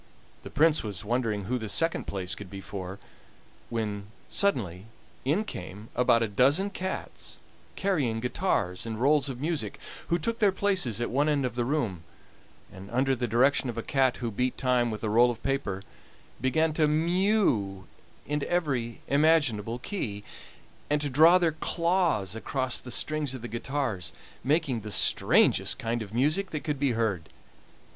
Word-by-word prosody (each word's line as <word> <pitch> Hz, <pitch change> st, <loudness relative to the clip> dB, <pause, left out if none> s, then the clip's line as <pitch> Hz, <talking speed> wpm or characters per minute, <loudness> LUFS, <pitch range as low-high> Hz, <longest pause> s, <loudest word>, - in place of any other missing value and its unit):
The -, -, -9 dB
Prince 155 Hz, +1 st, +3 dB
was 105 Hz, -4 st, -5 dB
wondering 115 Hz, -3 st, 0 dB
who 125 Hz, +6 st, -2 dB
the 110 Hz, -2 st, -5 dB
second 165 Hz, +11 st, 0 dB
place 95 Hz, -2 st, -3 dB
could 105 Hz, -3 st, -7 dB
be 100 Hz, +1 st, -7 dB
for, 95 Hz, -1 st, -7 dB, 0.7 s
when 105 Hz, -3 st, -3 dB, 0.2 s
suddenly 105 Hz, -, 0 dB, 0.4 s
in 155 Hz, +11 st, +2 dB
came 105 Hz, -, -8 dB
about 120 Hz, -2 st, +4 dB
a -, -, 0 dB
dozen 140 Hz, -, +2 dB
cats 190 Hz, 0 st, -5 dB, 0.4 s
carrying 145 Hz, -, 0 dB
guitars 110 Hz, -, -1 dB
and 110 Hz, -1 st, -4 dB
rolls 145 Hz, +2 st, +3 dB
of 125 Hz, -2 st, -6 dB
music, 155 Hz, +2 st, -2 dB, 0.3 s
who 170 Hz, -, +2 dB
took 230 Hz, +7 st, -2 dB
their 205 Hz, -4 st, +4 dB
places 185 Hz, -, 0 dB
at 120 Hz, -, -2 dB
one 145 Hz, +4 st, +2 dB
end 145 Hz, -3 st, +1 dB
of 125 Hz, -, -2 dB
the 120 Hz, 0 st, -1 dB
room, 120 Hz, -, -1 dB, 0.7 s
and 95 Hz, +1 st, -10 dB
under 130 Hz, +3 st, +1 dB
the 120 Hz, -1 st, -2 dB
direction 130 Hz, +4 st, +3 dB
of 115 Hz, -, -5 dB
a 115 Hz, -, -2 dB
cat 135 Hz, -3 st, +2 dB
who 120 Hz, -2 st, -3 dB
beat 125 Hz, +4 st, -1 dB
time 125 Hz, -2 st, +2 dB
with 110 Hz, -1 st, -5 dB
a -, -, 0 dB
roll 120 Hz, +3 st, +5 dB
of 115 Hz, -1 st, -5 dB
paper 135 Hz, -9 st, -2 dB, 0.6 s
began 155 Hz, +5 st, +2 dB
to 155 Hz, -1 st, +3 dB
mew 155 Hz, -, +1 dB, 0.4 s
in 150 Hz, 0 st, -2 dB
every 135 Hz, -10 st, -1 dB
imaginable 140 Hz, -7 st, +2 dB
key, 120 Hz, -, -4 dB, 0.7 s
and 150 Hz, 0 st, +2 dB
to 145 Hz, -2 st, -2 dB
draw 160 Hz, +7 st, +7 dB
their 170 Hz, -3 st, +2 dB
claws 165 Hz, -, 0 dB
across 130 Hz, +2 st, -1 dB
the 125 Hz, -, -10 dB
strings 150 Hz, +2 st, -1 dB
of 125 Hz, -, -9 dB
the -, -, -4 dB
guitars, 115 Hz, -, -3 dB, 0.3 s
making 140 Hz, -2 st, +1 dB
the 105 Hz, 0 st, -8 dB
strangest 95 Hz, -, +4 dB
kind 115 Hz, 0 st, -2 dB
of 105 Hz, -2 st, -7 dB
music 150 Hz, -, +1 dB
that 155 Hz, -, -4 dB
could 150 Hz, -3 st, -2 dB
be 135 Hz, -3 st, +2 dB
heard. 100 Hz, -8 st, -1 dB
125 Hz, 165 wpm, -28 LUFS, 110-155 Hz, 0.7 s, draw